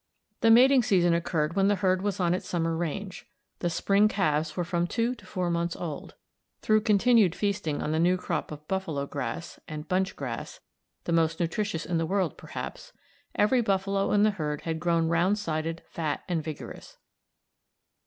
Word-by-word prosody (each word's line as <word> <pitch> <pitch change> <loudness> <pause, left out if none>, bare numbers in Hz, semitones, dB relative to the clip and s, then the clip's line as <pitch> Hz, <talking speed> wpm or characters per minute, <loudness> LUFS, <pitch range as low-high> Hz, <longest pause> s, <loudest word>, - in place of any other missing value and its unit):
The 225 - +4
mating 255 +3 +7
season 180 -6 +3
occurred 170 -2 0
when 195 0 +3
the 205 - +3
herd 185 -2 +1
was 205 -1 -2
on 175 -1 +2
its 180 - -4
summer 165 -2 0
range. 175 +4 -4 0.3
The 175 - 0
spring 200 +5 +3
calves 155 -6 0
were 175 - +1
from 170 0 -1
two 230 +5 0
to 250 - -15
four 180 -3 -2
months 170 0 -1
old. 160 -5 -6 0.5
Through 215 0 +4
continued 215 -3 +4
feasting 200 -8 -1
on 150 - -2
the 160 - +1
new 180 +2 +3
crop 180 - -3
of 150 0 -9
buffalo 165 -7 -2
grass 155 +4 -5
and 155 -1 -7
bunch 190 +2 0
grass - - -6 0.4
the - - -3
most 165 -1 +2
nutritious 170 0 -1
in 170 -2 0
the 165 - -1
world, 190 -4 0
perhaps - - -8 0.4
every 240 +4 +3
buffalo 195 -2 0
in 205 0 +4
the 215 - +4
herd 150 -6 -3
had 160 -1 -3
grown 170 -1 +1
round 175 +5 +2
sided, 165 -3 -3
fat, 155 -3 -3
and 170 -3 -1
vigorous. 155 -1 -8
175 Hz, 180 wpm, -27 LUFS, 165-200 Hz, 0.5 s, mating